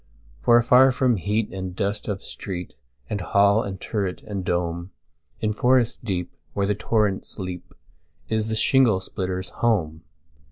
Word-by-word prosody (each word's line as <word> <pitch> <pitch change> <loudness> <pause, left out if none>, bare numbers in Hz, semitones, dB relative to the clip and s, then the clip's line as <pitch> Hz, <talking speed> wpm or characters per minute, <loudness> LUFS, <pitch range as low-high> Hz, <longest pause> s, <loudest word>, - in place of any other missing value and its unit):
For 120 - +6
afar 125 +3 +6
from 125 -2 +2
heat 105 +4 -1
and 95 -1 -5
dust 100 +2 -2
of 100 -2 -3
street, 90 -3 -6 0.3
And 100 - -3
hall 100 +3 +4
and 95 -3 -5
turret, 100 -4 -3
and 100 -3 -4
dome, 85 0 -2 0.5
In 110 -1 0
forest 125 +1 +2
deep, 90 -6 -3 0.2
where 100 - +1
the 105 - +1
torrents 105 -1 -1
leap, 90 -3 -7 0.5
Is 110 -1 0
the 110 - -1
shingle 115 -3 +4
splitter's 95 -1 -4
home. 80 -10 0
100 Hz, 150 wpm, -24 LUFS, 95-110 Hz, 0.5 s, For